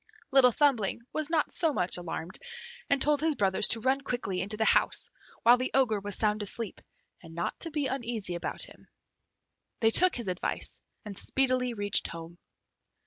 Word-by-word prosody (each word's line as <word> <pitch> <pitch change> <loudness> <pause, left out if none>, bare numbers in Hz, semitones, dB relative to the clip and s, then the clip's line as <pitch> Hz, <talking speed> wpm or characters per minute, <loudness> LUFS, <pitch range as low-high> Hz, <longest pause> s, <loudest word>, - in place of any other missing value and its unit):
Little 265 -2 +6
Thumbling 235 -5 +1
was 310 -1 -2
not 320 -3 +1
so 325 -3 +1
much 180 -7 +2
alarmed, 175 0 -4 0.5
and 280 - +3
told 295 +1 +2
his 315 -1 +1
brothers 195 -3 +3
to 225 - +6
run 265 +3 +1
quickly 240 -9 -3
into 210 +3 -1
the 220 - +1
house - - +2 0.3
while 240 +1 +7
the 255 +1 -2
Ogre 235 -6 +2
was 205 0 -5
sound 210 -1 0
asleep, 210 +1 -2 0.4
and 165 -1 -13
not 170 - -3
to 335 - -2
be 300 -2 -2
uneasy 235 -8 -2
about 170 - -3
him. - - -12 0.9
They 225 -2 +3
took 365 +8 +5
his 235 -5 -4
advice 180 -1 -4 0.3
and 205 -2 -7
speedily 255 +1 0
reached 205 -1 0
home. 170 +1 -10
230 Hz, 175 wpm, -29 LUFS, 195-270 Hz, 0.9 s, while